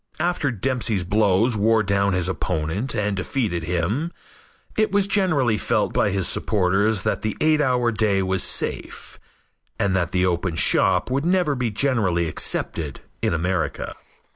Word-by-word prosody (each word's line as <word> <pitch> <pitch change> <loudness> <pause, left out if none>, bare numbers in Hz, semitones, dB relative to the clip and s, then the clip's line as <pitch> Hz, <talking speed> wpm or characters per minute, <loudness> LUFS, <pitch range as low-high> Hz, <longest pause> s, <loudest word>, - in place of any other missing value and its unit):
After 170 -3 0
Dempsey's 115 -4 -1
blows 105 +4 +2
wore 110 +1 +3
down 100 0 +1
his 90 -1 0
opponent 90 - -2
and 105 -1 -1
defeated 95 -3 -2
him, 90 - -1 0.6
it 215 -2 +1
was 200 0 +2
generally 160 - +1
felt - - 0
by - - +2
his 95 -2 0
supporters 100 0 +1
that 110 - -1
the 110 - -3
eight 155 -1 +3
hour 125 -3 +1
day 105 -3 +1
was 95 0 -1
safe, - - -2 0.6
and 100 -2 0
that 90 -2 0
the 90 -1 +1
open 85 -1 -1
shop 90 +5 +3
would 135 +2 0
never 175 -3 +2
be 125 -3 -1
generally 105 -8 +1
accepted 75 -1 -2 0.2
in - - +1
America. 85 -2 -2
105 Hz, 150 wpm, -22 LUFS, 90-125 Hz, 0.6 s, wore